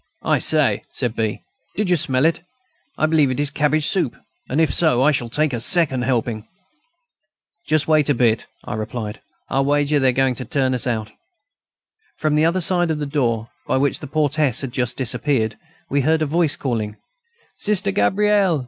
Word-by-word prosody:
"I - - +2
say!" - - +3
said 120 -2 -2
B., 110 -2 -2 0.3
"did 210 -1 -1
you - - +5
smell 140 -3 +1
it? 165 0 +1 0.6
I - - +2
believe 155 -3 +3
it 130 - -3
is 145 -1 +1
cabbage 150 +1 +1
soup, 180 -10 0 0.3
and 135 - 0
if 160 - +2
so, 145 -7 +3
I 150 - +5
shall 120 -5 -2
take 150 +3 0
a 120 - -2
second 140 -1 +2
helping." 115 -3 -2 1.2
"Just 155 -1 +1
wait 155 -2 +3
a 145 - +3
bit," 115 -2 +1 0.2
I - - -5
replied; 110 0 -5 0.3
"I'll 135 +1 0
wager 145 +1 +1
they 135 -1 +3
are 130 +1 +1
going 130 -1 +1
to 130 - -3
turn 130 -3 0
us 125 0 -1
out." 110 -3 -2 1.1
From 155 -1 0
the 155 +1 +3
other 175 +3 +1
side 175 0 +1
of 160 - -1
the 150 - -3
door, 120 -6 -1 0.2
by - - +1
which 140 +1 0
the 145 - -8
portress 145 -3 +1
had 135 -3 -5
just 125 -1 -2
disappeared, 125 -3 0 0.3
we 140 +1 0
heard 155 +3 +2
a - - +1
voice 160 0 +1
calling: 110 -5 -3 0.6
"Sister 205 - +1
Gabrielle!... 195 - +2
140 Hz, 190 wpm, -20 LUFS, 120-155 Hz, 1.2 s, you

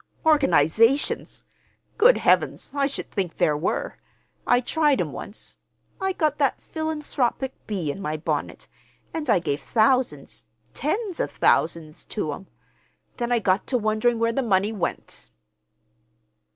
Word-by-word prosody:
"Organizations! 270 - +3 0.5
Good 480 +3 +6
Heavens, - - +1
I 280 -1 +1
should 275 - -6
think 185 -5 -3
there 165 -4 +2
were! 150 +5 -2 0.5
I 245 - +5
tried 295 +2 +1
'em - - -1
once. - - -9 0.4
I 385 0 +1
got 305 -4 0
that 280 -3 +1
philanthropic 300 -5 -2
bee 180 -9 -2
in 195 - -8
my 155 -3 -2
bonnet, 155 - -3 0.5
and 305 -4 -4
I - - +5
gave 150 -4 -2
thousands, 215 - 0 0.3
tens 385 - -2
of - - 0
thousands 155 -1 0
to 155 -9 -3
'em. 185 +6 -10 0.7
Then 240 -1 -2
I 240 - +4
got 195 -3 +1
to 255 - +1
wondering 220 +2 +1
where 230 0 +1
the 270 - 0
money 205 -3 +1
went." 205 -5 -5
235 Hz, 140 wpm, -24 LUFS, 185-285 Hz, 0.7 s, Good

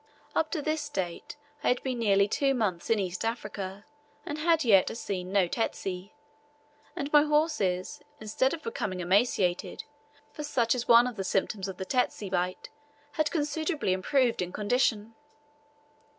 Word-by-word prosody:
Up 315 - +1
to 310 -5 -3
this 310 -1 -1
date 180 -4 -4 0.3
I - - 0
had 250 - +2
been 255 -2 -2
nearly 200 -3 +3
two 275 +5 +1
months 190 -8 -1
in 225 - +4
East 185 -3 -3
Africa, 205 -3 -4 0.4
and 300 - -4
had 330 0 +3
as - - -1
yet 200 0 +4
seen 185 -4 -4
no 195 -3 +3
tsetse; 190 -2 -3 0.9
and 295 -4 -4
my 295 - +8
horses, 295 - 0 0.2
instead 220 +5 0
of 315 - -14
becoming 200 -5 -3
emaciated 185 -1 +1 0.5
for 300 - -7
such 240 -6 +1
is 245 -2 -3
one 235 +1 +7
of 250 -3 -4
the 195 - -2
symptoms 195 +1 -1
of 190 -1 -7
a 190 - -3
tsetse 230 -3 -1
bite 180 0 -2 0.4
had 310 0 0
considerably 310 - -1
improved 240 +6 +1
in 180 0 -3
condition. 220 0 0
225 Hz, 160 wpm, -28 LUFS, 190-280 Hz, 0.9 s, my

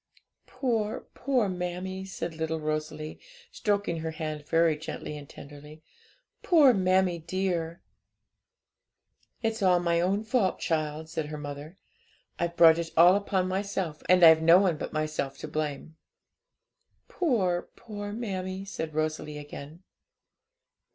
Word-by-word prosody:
'Poor, 225 -5 -1
poor 255 -5 +1
mammie!' 185 +1 -4
said 170 -3 -5
little 160 0 -3
Rosalie, 155 0 -4 0.3
stroking 205 -6 -1
her 160 0 -3
hand 155 -2 -5
very 165 -1 +3
gently 150 0 -6
and 145 -1 -10
tenderly 150 +2 -12 0.6
'poor 300 -8 +6
mammie 185 -3 +2
dear!' 170 -1 -2 1.6
'It's 225 0 -1
all 180 -2 +4
my 170 -1 +1
own 195 +4 +1
fault, 220 -4 +1
child,' 155 -1 -2
said 160 -1 -4
her 150 0 -6
mother; 145 +4 -8 0.6
'I've 170 0 -1
brought 165 -1 +7
it 165 -1 -3
all 175 +3 +8
upon 195 -2 0
my 190 +1 0
self, 190 -6 -4
and 180 -1 +6
I've 160 -1 +8
no 165 +2 +7
one 185 -4 +3
but - - -5
myself 155 -3 -2
to - - -7
blame.' 155 +1 -4 1.1
'Poor, 195 - 0
poor 205 -3 -7
mammie!' 190 -4 -4
said 160 -6 -5
Rosalie 155 -1 -2
again. 145 +3 -10
170 Hz, 130 wpm, -28 LUFS, 155-190 Hz, 1.6 s, all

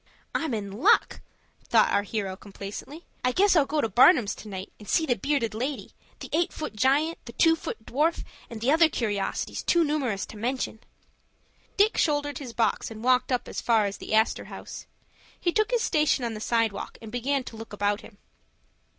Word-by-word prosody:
"I'm 315 -7 -1
in 200 -2 -5
luck," 310 - +3 0.5
thought - - +4
our 200 - +3
hero 200 -2 -3
complacently. 205 - -9 0.2
"I 250 - +2
guess 390 +7 +4
I'll 295 -4 +4
go 300 +1 0
to - - +1
Barnum's 240 - +5
to - - -10
night, 190 -2 -7
and 210 - -12
see 320 - +3
the 260 - +2
bearded 235 0 -1
lady, 260 +6 -4 0.3
the - - -7
eight 335 +2 +2
foot 305 -8 -6
giant, 285 +8 +2
the 235 - -9
two 325 +5 +4
foot 220 -8 -7
dwarf, 310 +6 0 0.3
and 225 -2 -8
the 250 +4 +2
other 325 +1 +5
curiosities, 205 -8 -2
too 340 -1 +3
numerous 275 -10 -1
to 215 - -11
mention." 240 0 -2 1.0
Dick 420 +2 +3
shouldered 290 -1 0
his 260 -5 -7
box 230 0 0
and 220 0 -9
walked 255 +1 +3
up 250 - 0
as - - -5
far 225 -3 +3
as 200 0 -3
the - - -2
Astor 220 +1 +2
House. - - -9 0.5
He 345 - +1
took 430 +4 +1
his 485 -2 +1
station 300 -5 +2
on 230 - -3
the 215 - -7
sidewalk, 225 -3 -1
and 220 -1 -10
began 260 +3 -1
to 235 - -9
look 225 0 -9
about 205 0 0
him. 205 - -15
245 Hz, 195 wpm, -26 LUFS, 215-300 Hz, 1.0 s, Barnum's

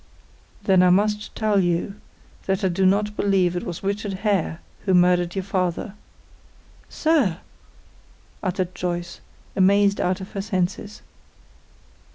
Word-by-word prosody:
"Then 190 -2 +4
I 180 - +5
must 210 +3 +1
tell 215 -2 +2
you 175 +2 -1 0.5
that 195 0 0
I 190 - +3
do 185 +2 +2
not 210 +2 +1
believe 190 -4 +2
it 175 - -1
was 175 0 -6
Richard 200 +1 -2
Hare 190 -5 0 0.3
who 190 -2 +3
murdered 180 0 +3
your 190 - -2
father." 185 0 -2 1.0
"Sir!" 295 - +1 1.0
uttered 185 -1 -2
Joyce, 175 -1 -4 0.3
amazed 200 +1 +3
out 180 0 0
of 190 - -9
her 195 - -3
senses. 195 +1 -3
190 Hz, 130 wpm, -23 LUFS, 180-200 Hz, 1.0 s, I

